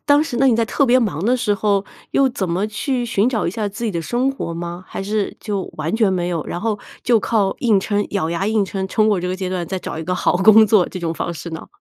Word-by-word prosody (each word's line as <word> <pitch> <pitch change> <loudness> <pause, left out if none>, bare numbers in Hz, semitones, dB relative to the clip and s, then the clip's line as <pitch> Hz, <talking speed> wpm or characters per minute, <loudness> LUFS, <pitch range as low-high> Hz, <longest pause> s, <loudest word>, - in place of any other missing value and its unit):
当 290 +1 +5
时， 250 -7 -4
那 270 - +4
你 245 - +5
在 230 - +2
特 275 +5 +1
别 250 +2 +5
忙 195 -7 -1
的 250 +3 +3
时 230 -4 0
候， 200 -1 +1 0.3
又 275 -1 +4
怎 195 -7 -3
么 185 +5 0
去 245 +3 -2
寻 230 0 +1
找 225 -8 -1
一 - - 0
下 210 +1 -2
自 210 +4 -6
己 220 - 0
的 170 - -2
生 245 +10 0
活 170 -11 -5
吗？ 175 +2 -6
还 - - -5
是 205 0 -2
就 200 -4 -3
完 155 +5 -2
全 215 -4 +3
没 175 -1 -1
有， 165 -3 -2
然 175 - -4
后 215 -2 -1 0.2
就 240 -2 +4
靠 205 -3 +1
硬 220 -5 +4
撑， 205 0 -1
咬 175 -5 -1
牙 170 +4 -1
硬 215 -2 +2
撑 190 0 -3
撑 215 +2 +2
过 200 -4 +2
这 180 - -3
个 185 - -1
阶 185 -1 -3
段， 180 -2 -3
再 190 - -3
找 160 - -6
一 160 - -5
个 180 +2 -1
好 175 - +1
工 215 +3 +7
作 200 -3 +4
这 185 - -7
种 165 -1 -1
方 170 - -3
式 165 +2 -7
呢？ 160 - -7
205 Hz, 305 characters per minute, -20 LUFS, 180-225 Hz, 0.3 s, 工